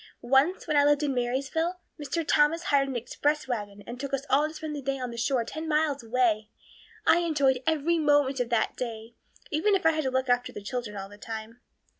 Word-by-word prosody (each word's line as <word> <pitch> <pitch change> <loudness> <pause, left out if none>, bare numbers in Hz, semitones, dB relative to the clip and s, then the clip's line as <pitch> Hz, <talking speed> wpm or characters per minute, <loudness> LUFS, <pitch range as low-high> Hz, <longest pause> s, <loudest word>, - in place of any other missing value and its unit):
"Once, 270 +9 +3
when 305 - -1
I 285 - +6
lived 290 +1 +3
in 285 -2 0
Marysville, 270 +8 -1 0.2
Mr. 320 +3 -2
Thomas 310 +3 +3
hired 275 -3 +2
an 265 - -4
express 290 +5 -1
wagon 205 -4 -4
and 240 +1 -8
took 275 0 -2
us 275 +1 -6
all 295 +2 +4
to 310 - -9
spend 310 -1 -5
the 290 - -5
day 275 0 -2
at 250 -2 -4
the - - -7
shore 240 +1 +1
ten 315 +7 -6
miles 300 -3 +1
away. 225 -2 +1 0.6
I 340 - +5
enjoyed 280 -7 +2
every 320 +2 +2
moment 290 -3 +3
of 245 -1 -1
that 235 -2 +1
day, 230 -2 -6 0.4
even 370 +7 +2
if 375 - -2
I 325 - +7
had 310 -2 -2
to - - +2
look 260 0 0
after 245 0 +1
the 205 - -8
children 210 -1 -4
all 195 0 -5
the 205 +1 -15
time. 225 +2 -7
270 Hz, 225 wpm, -27 LUFS, 240-300 Hz, 0.6 s, I